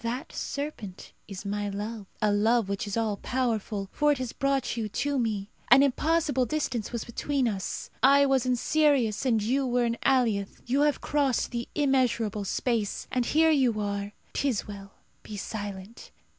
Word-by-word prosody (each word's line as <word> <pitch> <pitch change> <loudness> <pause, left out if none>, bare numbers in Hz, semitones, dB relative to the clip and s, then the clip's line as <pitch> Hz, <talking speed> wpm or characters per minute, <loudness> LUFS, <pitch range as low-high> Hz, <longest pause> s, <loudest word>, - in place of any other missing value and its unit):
That 240 +3 -4
serpent 280 -10 -5
is 195 0 -8
my 205 0 -2
love 205 +1 -5 0.2
a 210 - +4
love 220 +2 +3
which 200 +1 -3
is 205 - -3
all 220 -3 0
powerful, 220 -6 -2
for 295 0 +2
it 290 - +1
has 255 -2 -4
brought 275 -3 0
you 220 -3 -3
to 280 +6 -1
me. 215 -4 -2 0.2
An 270 - +8
impossible 285 -1 +1
distance 255 -6 -2
was 235 -2 -4
between 265 +2 -1
us. 195 -4 -4
I 280 +2 +6
was 270 -2 +2
in 250 - +3
Sirius, 265 -5 +2
and 225 -4 +2
you 265 +5 +1
were 245 0 +2
in 235 0 -2
Allioth. 230 -7 +1
You 265 +4 +1
have 295 -1 +2
crossed 280 -5 0
the 235 -1 -3
immeasurable 245 -7 +1
space, 225 0 -1
and 250 -2 0
here 320 +1 +4
you 255 -7 +2
are. 200 0 -3 0.2
'Tis 265 -7 0
well. 200 -1 -9 0.3
Be 210 - -8
silent. 205 0 -6
235 Hz, 170 wpm, -27 LUFS, 210-270 Hz, 0.3 s, An